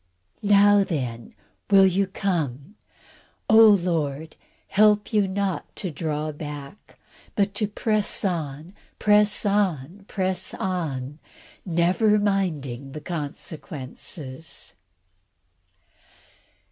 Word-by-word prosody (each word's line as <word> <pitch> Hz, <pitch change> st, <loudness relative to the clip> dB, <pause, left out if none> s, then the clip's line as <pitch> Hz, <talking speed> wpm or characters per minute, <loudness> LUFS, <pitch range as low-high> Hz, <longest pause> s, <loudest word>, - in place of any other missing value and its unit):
Now 205 Hz, 0 st, +5 dB
then, 125 Hz, -10 st, -4 dB, 0.3 s
will 195 Hz, -1 st, +7 dB
you 190 Hz, +1 st, +2 dB
come? 170 Hz, -5 st, -3 dB, 0.7 s
Oh! 220 Hz, -1 st, +8 dB
the 180 Hz, -2 st, -1 dB
Lord 155 Hz, -1 st, -3 dB, 0.3 s
help 210 Hz, +2 st, +3 dB
you 205 Hz, -2 st, +3 dB
not 195 Hz, -1 st, -3 dB
to 185 Hz, -, -3 dB
draw 155 Hz, 0 st, -3 dB
back, 145 Hz, +4 st, -9 dB, 0.4 s
but 200 Hz, -1 st, +1 dB
to 210 Hz, +1 st, 0 dB
press 210 Hz, 0 st, 0 dB
on, 160 Hz, -2 st, -3 dB, 0.2 s
press 210 Hz, 0 st, +3 dB
on, 195 Hz, -3 st, 0 dB
press 185 Hz, -1 st, -2 dB
on, 150 Hz, -7 st, -3 dB, 0.5 s
never 180 Hz, +5 st, +3 dB
minding 155 Hz, -11 st, -1 dB
the 150 Hz, -, -7 dB
consequences. 150 Hz, -2 st, -6 dB
180 Hz, 95 wpm, -24 LUFS, 150-200 Hz, 0.7 s, Oh